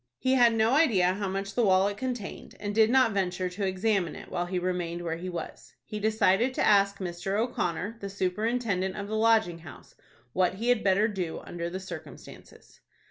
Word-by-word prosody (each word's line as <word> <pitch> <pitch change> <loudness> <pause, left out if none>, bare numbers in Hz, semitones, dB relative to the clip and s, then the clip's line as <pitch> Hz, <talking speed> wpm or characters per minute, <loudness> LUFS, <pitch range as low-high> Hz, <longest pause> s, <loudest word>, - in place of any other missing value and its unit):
He 260 - +1
had 240 -3 +5
no 220 +1 +3
idea 225 - +4
how 200 +1 -3
much 195 +1 -4
the 245 - +1
wallet 195 0 +3
contained, 245 -4 -5
and 205 0 -4
did 220 +1 +4
not 255 -2 +4
venture 185 -2 -1
to 195 +2 -3
examine 190 -1 0
it - - -11
while 175 0 -2
he 180 +1 -2
remained 175 -1 -2
where 165 -1 -3
he 180 +2 -6
was. 175 -1 -8
He 210 - -5
decided 220 +3 +2
to - - +1
ask 200 -1 +4
Mr. 185 +1 -3
O'Connor, 220 -2 -2
the 200 - -4
superintendent 195 0 -1
of 200 -1 -5
the 215 - -3
Lodging 220 -6 +3
House, 150 -5 -13 0.4
what 185 0 +1
he 230 +5 -2
had 245 -3 +3
better 200 +2 +3
do 185 -6 -4
under 170 0 -5
the 185 +2 -5
circumstances. 180 -4 -11
195 Hz, 190 wpm, -28 LUFS, 180-220 Hz, 0.4 s, had